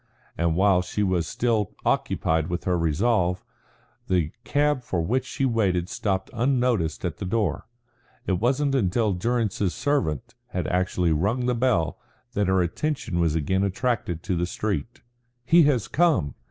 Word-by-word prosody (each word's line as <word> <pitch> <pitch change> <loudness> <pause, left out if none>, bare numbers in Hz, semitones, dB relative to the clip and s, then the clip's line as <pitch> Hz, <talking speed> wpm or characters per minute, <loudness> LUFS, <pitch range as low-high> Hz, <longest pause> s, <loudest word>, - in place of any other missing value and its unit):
And 85 0 +1
while 95 0 +4
she 90 +3 -2
was 90 -4 0
still 115 -4 0
occupied 80 -1 +1
with 90 -1 -3
her 90 - +1
resolve, 90 +3 +1 0.6
the 85 -4 +1
cab 145 -2 +1
for 90 -7 -2
which 125 +9 0
she 135 - -1
waited 95 -8 +1
stopped 95 -1 -2
unnoticed 120 - 0
at 85 - -3
the - - -6
door. 105 -1 -1 0.6
It 95 -2 0
was 125 +5 +1
not 145 -2 +1
until 110 -3 +1
Durrance's 105 -2 -1
servant 125 - -1
had - - -3
actually 90 -1 +1
rung 105 +11 0
the 125 - +2
bell 115 -9 +1 0.3
that 105 -1 +1
her 95 -1 +3
attention 115 - -2
was 80 -2 +2
again 90 +5 0
attracted 100 -4 -1
to 90 - -1
the 85 +1 0
street. 110 +5 -3 0.4
"He 165 +1 +6
has 125 -9 +2
come!" 150 - +2
100 Hz, 155 wpm, -25 LUFS, 90-120 Hz, 0.6 s, He